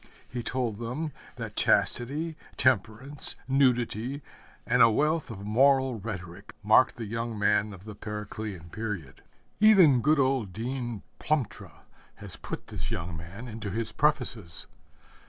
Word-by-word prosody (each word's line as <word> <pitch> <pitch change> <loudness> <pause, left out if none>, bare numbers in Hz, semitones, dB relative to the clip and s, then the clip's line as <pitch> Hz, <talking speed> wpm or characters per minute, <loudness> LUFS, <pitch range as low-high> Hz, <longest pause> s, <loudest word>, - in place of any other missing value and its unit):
He 120 +2 -4
told 120 -3 -2
them 130 +7 -3 0.2
that - - -6
chastity, 150 +7 +1 0.2
temperance, 130 +3 +1
nudity, 130 0 +1 0.4
and - - +3
a 115 - +9
wealth 150 +6 +1
of 100 -3 -7
moral 130 +2 +3
rhetoric 100 -2 -7
marked 110 +5 +5
the 115 - -5
young 115 +1 -3
man 105 0 +2
of 95 -2 -11
the 110 - -7
Periclean 105 -4 -6
period. 100 -12 -5 0.4
Even 185 - +7
good 155 +4 +4
old 130 -8 +1
Dean 120 -1 -4 0.2
Plumptre 145 -8 -1 0.5
has - - -7
put - - -6
this - - -5
young 85 0 -3
man 90 +9 -8
into 110 -2 -5
his 110 +2 -2
prefaces. 125 - 0
115 Hz, 135 wpm, -28 LUFS, 105-135 Hz, 0.5 s, a